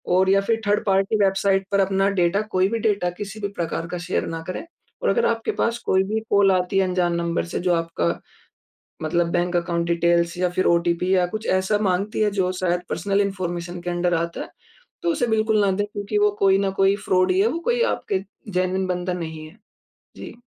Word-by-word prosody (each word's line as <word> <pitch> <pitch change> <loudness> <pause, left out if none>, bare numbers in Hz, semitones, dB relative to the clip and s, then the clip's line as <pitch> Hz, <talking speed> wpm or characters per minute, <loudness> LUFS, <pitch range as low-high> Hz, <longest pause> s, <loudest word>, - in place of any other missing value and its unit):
और 190 +1 +3
या 195 0 +4
फिर 225 +3 0
थर्ड 205 0 +2
पार्टी 195 +1 +2
वेबसाइट 195 0 +2
पर 200 - +2
अपना 195 0 +2
डाटा 175 +4 +2
कोई 185 0 +3
भी 230 +1 -1
डाटा 205 -5 +1
किसी 205 +1 -6
भी 200 - -1
प्रकार 165 0 -2
का 180 - -4
शेयर - - 0
ना 165 0 -4
करें। 185 - -5 0.4
और - - +2
अगर 470 - +2
आपके 230 0 -1
पास 230 0 +1
कोई 190 0 +3
भी 215 +3 -1
कॉल 200 -1 +5
आती 180 +1 0
है - - +4
अनजान 180 -1 0
नंबर 170 0 -1
से 175 - -4
जो 180 0 +1
आपका, 165 - -1 1.0
मतलब 170 +2 0
बैंक 175 0 0
अकाउंट 170 0 -1
डिटेल्स 170 0 +2
या 180 0 +2
फिर 185 +1 0
ओटीपी 170 +2 +1
या 180 -1 +3
कुछ 215 - -4
ऐसा 190 +3 0
माँगती 195 +4 -1
है 210 - +3
जो 180 -1 +1
शायद 175 -1 0
पर्सनल 195 +4 0
इन्फॉर्मेशन 175 -3 -4
के 175 - -3
अंडर 175 0 0
आता 170 0 -2
है। - - -8 0.5
तो 345 - +1
उसे 255 -6 0
बिल्कुल 220 -1 +2
ना 195 - +3
दे 205 +2 0
क्योंकि 205 +1 -2
वो 210 0 +4
कोई 195 -1 +4
ना - - +1
कोई 195 +1 +4
फ्रॉड 185 0 +3
ही 185 - +2
है। 205 - +4
वो 320 - -2
कोई 480 0 +2
आपके 190 -1 -3 0.3
जेनुइन 185 +1 0
बंदा 180 0 -2
नहीं 160 -3 -6
है। 160 +8 -16 0.6
जी। - - -9
185 Hz, 215 wpm, -23 LUFS, 175-200 Hz, 1.0 s, कॉल